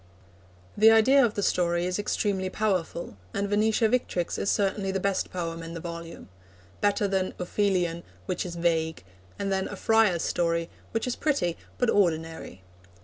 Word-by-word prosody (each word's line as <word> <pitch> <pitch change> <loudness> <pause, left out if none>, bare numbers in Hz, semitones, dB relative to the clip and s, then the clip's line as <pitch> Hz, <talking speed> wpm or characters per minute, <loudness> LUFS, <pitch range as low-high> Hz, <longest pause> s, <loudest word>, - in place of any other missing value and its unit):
The 215 +2 +7
idea 255 +5 +6
of 225 -3 +1
the 205 - -1
story 175 -1 +1
is 180 +2 -1
extremely 200 -2 -1
powerful, 185 - -2 0.2
and 200 0 0
Venetia 215 +2 +2
Victrix 215 -7 -1
is 200 - 0
certainly 195 -1 0
the 190 - -1
best 195 0 0
poem 165 -2 -4
in 165 +1 -7
the - - -4
volume 170 0 -8 0.5
better 205 0 +2
than 190 -1 -1
Ophelion, 180 -2 0 0.2
which 180 - -2
is 175 -2 -6
vague, 160 - 0 0.3
and 200 -1 -2
than 190 0 0
A - - -6
Friar's 220 -6 +3
Story, 170 -1 0 0.2
which 225 - -2
is 250 - -2
pretty 275 - 0 0.2
but 245 -2 +2
ordinary. 160 - -1
190 Hz, 160 wpm, -27 LUFS, 170-205 Hz, 0.5 s, The